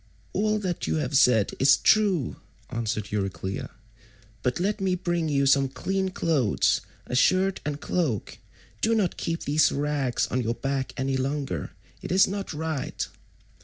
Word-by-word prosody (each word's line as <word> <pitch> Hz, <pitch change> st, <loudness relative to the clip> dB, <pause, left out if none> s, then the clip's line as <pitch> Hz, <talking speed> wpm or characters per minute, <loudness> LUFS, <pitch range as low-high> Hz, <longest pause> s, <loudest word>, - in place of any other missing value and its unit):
"All 215 Hz, +1 st, +1 dB
that 185 Hz, -5 st, -3 dB
you -, -, 0 dB
have 145 Hz, -3 st, -1 dB
said 120 Hz, -6 st, +5 dB
is 140 Hz, +1 st, +6 dB
true," 195 Hz, -, +2 dB, 0.3 s
answered 110 Hz, -3 st, -2 dB
Euryclea, 95 Hz, -2 st, -3 dB, 0.7 s
"but 125 Hz, +5 st, -1 dB
let 205 Hz, +3 st, -1 dB
me 190 Hz, -1 st, +1 dB
bring 175 Hz, -3 st, -1 dB
you 140 Hz, -1 st, +2 dB
some 135 Hz, 0 st, +4 dB
clean 190 Hz, +9 st, -1 dB
clothes—a 140 Hz, -, 0 dB
shirt 185 Hz, +8 st, +3 dB
and 145 Hz, 0 st, -3 dB
cloak. 150 Hz, -, -2 dB, 0.4 s
Do 225 Hz, +1 st, +3 dB
not 200 Hz, -6 st, +1 dB
keep 165 Hz, 0 st, -3 dB
these 150 Hz, +2 st, +3 dB
rags 140 Hz, -3 st, 0 dB
on 130 Hz, -, +1 dB
your 115 Hz, 0 st, -1 dB
back 135 Hz, -1 st, -2 dB
any 135 Hz, 0 st, 0 dB
longer. 135 Hz, +1 st, -3 dB, 0.3 s
It -, -, -6 dB
is 190 Hz, +2 st, +5 dB
not 200 Hz, 0 st, -4 dB
right." 155 Hz, -2 st, -3 dB
145 Hz, 150 wpm, -26 LUFS, 130-185 Hz, 0.7 s, is